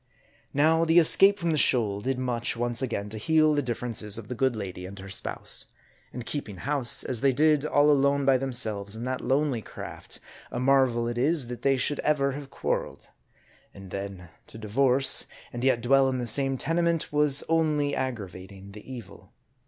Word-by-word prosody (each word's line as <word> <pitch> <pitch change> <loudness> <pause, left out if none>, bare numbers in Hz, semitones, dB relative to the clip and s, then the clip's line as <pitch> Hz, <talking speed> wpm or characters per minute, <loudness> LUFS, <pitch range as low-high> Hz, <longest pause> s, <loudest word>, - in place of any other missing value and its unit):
Now, 160 +3 +3
the 165 +1 +3
escape 195 +4 +6
from 170 -4 -1
the 155 - +1
shoal 105 -7 +2
did 130 +3 -2
much 125 -2 -2
once 120 +1 -1
again 110 -6 -3
to 110 +1 -6
heal 155 +5 +3
the 145 - +1
differences 115 -4 -3
of 110 -3 -9
the - - -3
good 130 0 0
lady 95 -3 -6
and 100 +1 -11
her 95 0 -9
spouse. - - -2 0.4
And 125 -1 -7
keeping 115 -10 -5
house, 140 +1 0
as 120 -3 -3
they 140 - +4
did, 150 +2 +2
all 145 0 +4
alone 140 0 +2
by 135 -1 +4
themselves, 110 -6 -1
in 115 - -7
that 130 +1 -3
lonely 135 -3 0
craft, - - -9 0.3
a - - -4
marvel 130 -3 +2
it 120 0 -3
is, 145 +1 +2
that 125 - -7
they 135 -1 +2
should 145 +3 -1
ever 140 -2 +1
have 140 0 -8
quar - - -1
reled. - - -15 0.7
And 95 -2 -12
then 100 -3 -7 0.2
to - - -10
divorce, 130 +5 +2 0.3
and 120 0 -5
yet 130 -3 +2
dwell 135 +2 +3
in 130 - -2
the 125 - -3
same 135 +3 +1
tenement, 165 +1 0
was 145 -1 +3
only 155 -3 +1
aggravating 100 -5 -6
the 105 +5 -12
evil. 120 -6 -11
130 Hz, 190 wpm, -26 LUFS, 110-145 Hz, 0.7 s, escape